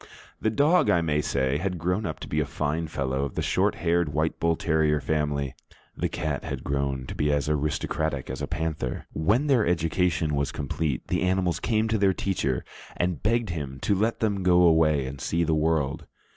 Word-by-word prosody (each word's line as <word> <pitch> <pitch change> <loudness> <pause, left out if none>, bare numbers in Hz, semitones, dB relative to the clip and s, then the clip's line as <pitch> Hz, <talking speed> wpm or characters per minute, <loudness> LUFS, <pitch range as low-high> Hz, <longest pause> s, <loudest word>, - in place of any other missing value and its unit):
The 110 - +2
dog, 150 +10 +3
I 85 - +4
may 75 -2 +1
say, 70 0 0
had 90 +1 -2
grown 90 +4 -1
up 80 - -5
to - - -6
be - - -1
a - - +1
fine 75 +2 -2
fellow 70 -2 -2
of 70 - -4
the - - -1
short - - +1
haired, 85 -1 +1
white 75 +2 0
bull 85 0 +2
terrier 80 -2 +1
family; 70 -2 -1 0.4
the - - -1
cat 75 -3 -3
had - - -5
grown 70 -2 -1
to - - -6
be 75 0 0
as 75 0 0
aristocratic 75 -1 -1
as - - -5
a - - -2
panther. 80 -6 -3
When 105 - +2
their 135 -6 +3
education 85 -2 +1
was 70 -1 0
complete, 70 -1 -2
the - - 0
animals 90 -1 +1
came 110 -1 +1
to 110 -1 +1
their 100 -1 +4
teacher 75 -10 -1 0.3
and 90 -4 -1
begged 115 -1 +1
him 70 -5 -5
to - - +1
let 110 +4 0
them 100 -3 +1
go 90 -1 +5
away 80 -4 +4
and 65 +1 -7
see 85 +1 0
the 80 -1 +1
world. 75 -3 0
80 Hz, 200 wpm, -26 LUFS, 70-90 Hz, 0.4 s, go